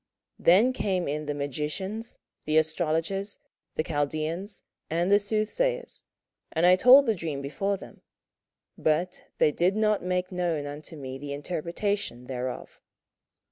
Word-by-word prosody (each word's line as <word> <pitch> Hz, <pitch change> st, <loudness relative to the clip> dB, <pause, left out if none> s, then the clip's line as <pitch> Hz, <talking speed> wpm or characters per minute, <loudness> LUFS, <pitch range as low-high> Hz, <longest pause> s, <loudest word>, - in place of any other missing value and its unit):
27:004:007 -, -, -18 dB
Then 210 Hz, +9 st, +6 dB
came 190 Hz, -7 st, -1 dB
in 150 Hz, +2 st, -2 dB
the 145 Hz, -, -1 dB
magicians, 150 Hz, -, -3 dB, 0.3 s
the 155 Hz, +1 st, +2 dB
astrologers, 165 Hz, +5 st, 0 dB, 0.4 s
the 155 Hz, -, 0 dB
Chaldeans, 155 Hz, +6 st, -2 dB, 0.3 s
and 170 Hz, +4 st, +1 dB
the 205 Hz, -, +7 dB
soothsayers: 470 Hz, -, -1 dB, 0.5 s
and 165 Hz, +1 st, +2 dB
I 180 Hz, +1 st, +8 dB
told 255 Hz, +8 st, +8 dB
the 225 Hz, -, +3 dB
dream 165 Hz, -7 st, -4 dB
before 195 Hz, +9 st, -2 dB
them; -, -, -13 dB, 0.8 s
but 170 Hz, +4 st, 0 dB
they 150 Hz, -, +4 dB
did 180 Hz, +6 st, +1 dB
not 215 Hz, -1 st, +2 dB
make 180 Hz, +1 st, -1 dB
known 175 Hz, -5 st, -1 dB
unto 145 Hz, +3 st, -8 dB
me 135 Hz, -2 st, -7 dB
the 140 Hz, 0 st, -5 dB
interpretation 170 Hz, -, -3 dB
thereof. 125 Hz, -1 st, -5 dB
170 Hz, 140 wpm, -27 LUFS, 150-200 Hz, 0.8 s, I